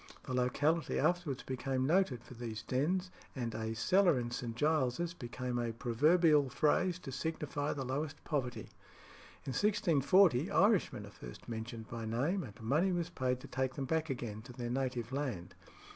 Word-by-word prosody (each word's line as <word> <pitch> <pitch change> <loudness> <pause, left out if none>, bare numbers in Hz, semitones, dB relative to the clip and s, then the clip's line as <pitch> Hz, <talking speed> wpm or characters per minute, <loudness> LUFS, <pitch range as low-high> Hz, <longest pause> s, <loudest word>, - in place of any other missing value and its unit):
The 130 - -5
locality 145 +6 +1
afterwards 175 -7 0
became 130 0 -1
noted 150 -7 +2
for - - -12
these 115 -2 -6
dens, 180 - 0 0.2
and 120 -4 -3
"a 110 0 -3
cellar 180 - +4
in 120 0 -3
St. 120 -1 -4
Giles's" 155 +4 +1
became 125 -4 -4
a 120 -1 -1
proverbial 145 +5 +4
phrase 165 +6 +2
to 150 -6 -8
signify 145 0 -2
the 135 -2 -4
lowest 145 +4 -3
poverty. 135 -6 -3 0.7
In 135 - -3
1640 185 - +4
Irishmen 200 +1 +3
are - - -12
first - - -11
mentioned 110 -1 -6
by 115 0 -5
name, 145 - 0
and 110 -5 -10
money 150 +12 +2
was 175 -1 -1
paid 125 -4 -1
to - - -9
take 130 0 -2
them 140 - -2
back 160 +2 0
again 115 -5 -4
to 120 +2 -11
their 120 -1 -4
native 125 -2 -2
land. 130 -11 -3
135 Hz, 165 wpm, -34 LUFS, 120-160 Hz, 0.7 s, cellar